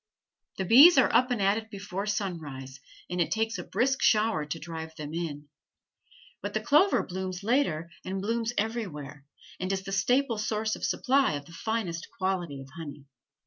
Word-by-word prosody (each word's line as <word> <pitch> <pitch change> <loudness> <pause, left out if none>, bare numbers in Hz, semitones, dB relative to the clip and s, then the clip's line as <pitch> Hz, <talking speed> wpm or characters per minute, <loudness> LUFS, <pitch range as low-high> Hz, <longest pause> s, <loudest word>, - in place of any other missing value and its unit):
The 190 - -1
bees 280 - +9
are 265 - +5
up 255 +1 +4
and 245 -3 0
at 200 +2 +3
it 220 0 -12
before 200 -1 -5
sunrise, 150 -10 -4 0.3
and 180 0 -1
it 165 - +1
takes 225 -2 -1
a - - -4
brisk 260 +9 0
shower 210 -8 +3
to 150 - -3
drive 160 0 -7
them 150 -1 -7
in. 150 -4 -4 0.9
But 205 +2 -5
the - - +2
clover 300 - +4
blooms 185 0 -5
later 185 - +1
and 190 +1 -3
blooms 230 +3 -1
everywhere, 150 - -3 0.3
and 185 +1 -2
is 190 -1 -1
the 195 - -6
staple 245 +4 +2
source 215 0 -1
of - - -11
supply 270 - +2
of 145 -1 -5
the 170 - -14
finest 180 -3 -3
quality 180 -7 -2
of 135 - -12
honey. 145 -4 -8
195 Hz, 180 wpm, -28 LUFS, 165-225 Hz, 0.9 s, bees